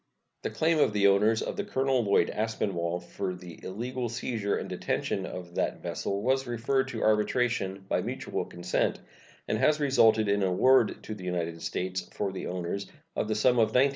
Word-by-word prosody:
The - - -2
claim 160 0 +2
of 110 - +3
the 100 -1 +2
owners 105 +3 +4
of - - -4
the - - -1
Colonel 130 -2 +1
Lloyd 100 -1 +3
Aspinwall 95 -6 -1
for 90 +1 -4
the 90 -2 -11
illegal 120 +5 -3
seizure 110 -3 -1
and - - -4
detention 95 -1 -2
of 90 -1 -8
that - - -2
vessel 100 +1 -2
was 130 +1 +1
referred 125 +3 0
to 120 -4 -4
arbitration 105 -3 +1
by - - +1
mutual - - -3
consent, 85 - -1 0.5
and 110 - 0
has 150 +4 +3
resulted 115 -6 +4
in 100 0 +2
an 95 - +3
award 125 +6 +4
to 110 - -5
the 100 -3 -9
United 85 -2 -2
States, 95 0 -3
for 100 -2 -2
the 95 - -5
owners, 90 +2 -3 0.3
of - - -1
the 110 - 0
sum 120 +3 +3
of 110 -1 +3
$19,702. 130 +3 +5
105 Hz, 190 wpm, -29 LUFS, 95-125 Hz, 0.5 s, $19,702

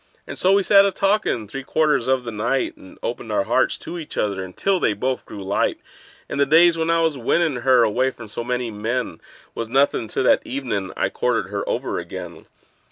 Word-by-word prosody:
And - - -7
so 190 +1 +4
we 200 0 +4
sat 200 0 +6
a 200 - +2
talkin' 195 - 0
three 135 +6 -6
quarters 150 -3 +1
of 130 -1 +2
the 115 - -5
night, 120 +5 -1
And 95 - -15
opened - - -4
our - - +1
hearts - - +1
to 175 - -7
each 155 - -9
other 100 -3 -1
until 180 - -1
they 110 - +2
both 130 +5 -3
grew 100 - -8
light; 95 +1 0 0.5
And - - -4
the 140 - +5
days 165 +3 +6
when 165 0 -1
I 165 0 +3
was 160 -4 0
winnin' 150 +4 +1
her 125 0 +4
away 125 +4 +2
from 120 -4 -11
so 110 - -5
many 125 -1 -2
men 110 -3 -3 0.3
Was 115 -1 -5
nothin' 135 -3 +2
to 110 - -1
that 130 - +4
evenin' 280 -2 -3
I - - +1
courted 480 +1 -1
her - - -3
over - - -2
again. - - -8
130 Hz, 215 wpm, -22 LUFS, 115-170 Hz, 0.5 s, sat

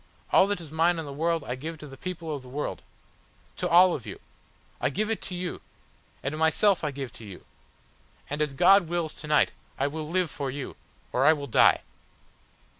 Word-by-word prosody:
All 190 - +6
that 205 -2 -1
is 160 -4 -10
mine 165 +2 +2
in 160 - -4
the 140 - -7
world 165 +2 0
I 125 - -4
give 160 +6 -6
to 150 - -10
the 135 -2 -10
people 165 -1 -5
of 140 - -7
the 130 - -13
world. 145 +3 -4 0.8
To - - -1
all 180 +1 +7
of 125 - -5
you. - - -7 0.6
I - - +1
give 215 +10 -1
it 225 - -2
to 185 - -4
you, 180 0 -4 0.6
and 140 +3 -2
myself 165 +4 +3
I 150 - 0
give 135 -3 -6
to - - -11
you. 100 -4 -11 0.8
And 145 +1 -3
as 150 -2 0
God 195 +6 +6
wills 170 -2 -2
to 150 - -10
night, 150 -1 +3 0.3
I 135 - +1
will 150 +1 -4
live 180 -2 0
for 140 -2 -3
you, 135 +1 -6 0.4
or 125 - +1
I 155 +3 +7
will 145 -2 -5
die." 125 - +5
155 Hz, 210 wpm, -27 LUFS, 140-175 Hz, 0.8 s, all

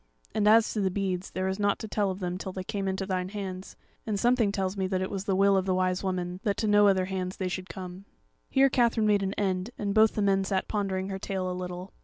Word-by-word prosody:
And 210 -1 +2
as 225 +1 +5
to 215 - -1
the 190 - +2
beads, 185 -1 -2
there 185 +1 -2
is 190 +1 -2
nought 205 -1 +2
to 220 - -6
tell 205 -1 0
of 190 0 -4
them 180 -1 -3
till 190 - -5
they 185 0 -5
came 200 -1 -3
into 190 0 -2
thine 185 -1 -2
hands; 190 -2 -6 0.3
and 210 -3 -2
something 240 -2 +3
tells 190 -1 -2
me 190 -1 -1
that 185 -1 -1
it 185 - -4
was 195 -1 -4
the 195 -3 +1
will 200 +1 +4
of 190 0 +1
the 185 - +2
Wise 185 0 0
Woman 180 -1 -2
that 205 -3 -1
to 220 - 0
no 205 0 +6
other 190 -2 +3
hands 185 -1 -4
they 190 - -2
should 185 +1 -5
come." 185 0 -8 0.4
Here 270 0 +5
Katherine 235 -4 +2
made 205 -1 +3
an 195 0 -2
end, 190 0 -1
and 200 -1 -2
both 220 0 +5
the 210 - +1
men 195 -1 +3
sat 190 -1 -1
pondering 195 -2 -2
her 195 0 -4
tale 190 -2 -3
a - - -2
little. 180 +1 -6
195 Hz, 270 wpm, -28 LUFS, 185-205 Hz, 0.4 s, no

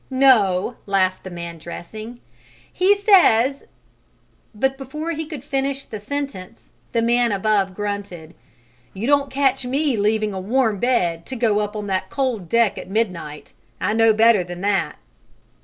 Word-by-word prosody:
"No," 245 -6 +3
laughed 185 -2 +1
the 190 - -7
man 170 -1 -7
dressing, 215 +8 -9 0.5
"he 385 +3 +4
says 285 - +4 0.5
" - - -37
But 265 0 +1
before 300 +5 -5
he 320 -1 -4
could 300 -5 -8
finish 275 -1 -2
the 215 - -7
sentence 230 -4 -6 0.2
the 230 -1 +1
man 240 0 +2
above 200 -1 +1
grunted: 200 -6 -5 0.6
"You 200 +4 -4
don't 280 +1 +2
catch 270 -1 +1
me 275 +2 0
leaving 215 0 +1
a 190 - -4
warm 220 +1 0
bed 175 -9 0
to 260 - -5
go 225 -4 +1
up 210 0 -3
on 210 -1 -4
that 190 -1 -2
cold 245 -10 -2
deck 230 -3 +2
at - - -9
midnight. 180 -8 -3 0.3
I 215 - 0
know 225 0 +5
better 220 -2 +4
than 175 0 -8
that." 195 -3 0
220 Hz, 155 wpm, -21 LUFS, 195-265 Hz, 0.6 s, know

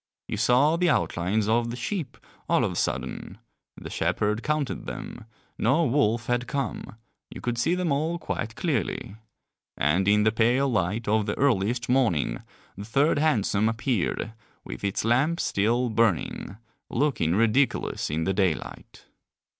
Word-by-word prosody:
You - - -3
saw 125 +9 +3
the 180 0 +2
outlines 100 - 0
of 115 +1 +2
the 120 - -4
sheep 140 - -4 0.3
all - - +3
of - - -1
a - - -6
sudden, - - -3 0.4
the - - -8
shepherd 105 +2 0
counted 150 -2 -2
them, 120 - -7 0.3
no 140 +9 +3
wolf 120 -3 +1
had 120 +1 -1
come, 135 -6 -4 0.3
you - - -9
could 120 -1 -2
see 165 +8 +2
them 180 -3 -1
all 155 +5 0
quite 115 -8 -4
clearly. 125 - -2 0.6
And 85 +8 +1
in 105 +1 +4
the 110 - +4
pale 120 +5 +2
light 105 -1 -1
of 110 0 +1
the 100 - -2
earliest 120 -3 +1
morning 125 - +1 0.3
the 100 - -7
third 140 +8 +2
hansom 110 -8 +2
appeared, 115 -2 -1 0.3
with - - -8
its 100 +1 -1
lamps 140 +9 +2
still 115 +4 +1
burning, 105 -3 0 0.3
looking 120 - +1
ridiculous 115 +5 +1
in 80 +2 -1
the 95 - 0
daylight. 95 -5 -2
115 Hz, 150 wpm, -26 LUFS, 105-140 Hz, 0.6 s, in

